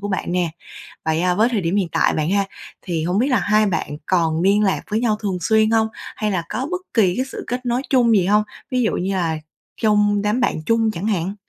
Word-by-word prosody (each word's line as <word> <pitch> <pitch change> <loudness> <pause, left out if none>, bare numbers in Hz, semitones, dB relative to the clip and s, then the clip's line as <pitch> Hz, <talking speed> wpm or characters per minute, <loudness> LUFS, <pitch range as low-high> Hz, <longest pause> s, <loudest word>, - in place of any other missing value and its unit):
của 205 - -4
bạn 190 -3 -2
nè. 175 -2 0 0.6
Vậy, 160 +1 +1
à, 180 0 +2
với 220 +6 +3
thời 220 -5 0
điểm 170 +3 -1
hiện 195 -4 +1
tại - - +2
bạn 155 +2 -1
ha, 200 0 +2 0.4
thì 165 -4 -3
hông 180 +4 0
biết 250 - +2
là 255 -5 +2
hai 215 +1 +3
bạn 165 -6 -2
còn 165 -3 +1
liên 200 +3 +3
lạc 190 -2 +1
với 215 - +1
nhau 230 -3 +1
thường 195 -4 -2
xuyên 220 +4 +3
hông? 225 -1 +3 0.3
Hay 210 -1 -1
là 175 -3 -1
có 265 +3 -3
bất 365 0 -2
kỳ 190 -6 +3
cái 255 - -1
sự - - -6
kết 250 +1 -3
nối 245 +1 0
chung 245 -4 +4
gì 190 -3 +3
hông? 210 +2 +3 0.3
Ví 255 -1 +1
dụ 220 - +1
như 190 +2 -1
là 165 -4 0 0.4
trong 210 -1 +3
đám 210 +5 0
bạn 160 - 0
chung 225 +1 +2
chẳng 195 +2 -4
hạn? 195 -1 -1
205 Hz, 250 wpm, -20 LUFS, 180-225 Hz, 0.6 s, chung